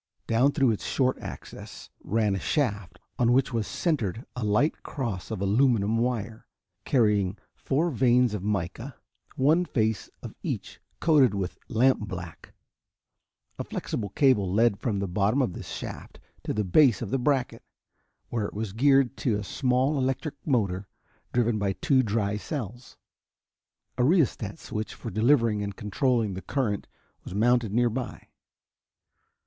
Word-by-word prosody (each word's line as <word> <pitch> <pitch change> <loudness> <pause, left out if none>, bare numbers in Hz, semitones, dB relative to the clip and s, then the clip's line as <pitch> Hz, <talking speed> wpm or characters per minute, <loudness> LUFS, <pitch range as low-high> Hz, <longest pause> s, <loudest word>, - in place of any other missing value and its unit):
Down 125 +5 +3
through 135 -5 +3
its 105 - -3
short 130 -1 0
axis - - -9
ran 105 +1 +1
a 95 - -1
shaft 105 - -1 0.2
on 120 -1 +4
which 130 0 +2
was 115 -2 -1
centered 120 - -1
a 125 - -4
light 105 +9 +1
cross 115 - -4
of 110 -4 -4
aluminum 110 0 +2
wire, 115 -2 -2 0.4
carrying 105 -6 +2 0.2
four 160 +5 0
vanes 125 -2 +3
of 105 - -3
mica, 105 +6 -3 0.4
one 155 +7 +3
face 110 -9 -1
of - - -7
each - - -5 0.2
coated 140 -10 +4
with 95 -2 -4
lampblack. 105 -8 -1 1.1
A - - -1
flexible 105 -3 -4
cable 105 -10 +3
led 110 0 +3
from 110 -4 -1
the 100 0 -2
bottom 100 +7 +1
of 125 -10 +1
this - - -8
shaft - - -7 0.3
to - - -1
the 105 - 0
base 115 - +4
of 105 - -6
the 135 - +1
bracket, 130 -1 0 0.7
where 115 -3 -1
it - - -11
was 105 -2 -4
geared 135 +2 +3
to 115 -5 0
a 105 - -4
small 130 +6 +1
electric 135 +3 -1
motor 100 -8 0 0.4
driven 120 -3 +1
by 100 -1 0
two 130 +8 +2
dry 105 -3 0
cells. 120 - -6 1.0
A - - +4
rheostat 130 - +2
switch 110 0 -5
for 115 - -7
delivering 115 -2 +3
and 100 -1 -4
controlling 110 0 0
the 95 - -6
current 105 0 -2 0.4
was 90 - -8
mounted 120 0 +2
nearby. 120 +2 -1
115 Hz, 145 wpm, -27 LUFS, 105-130 Hz, 1.1 s, on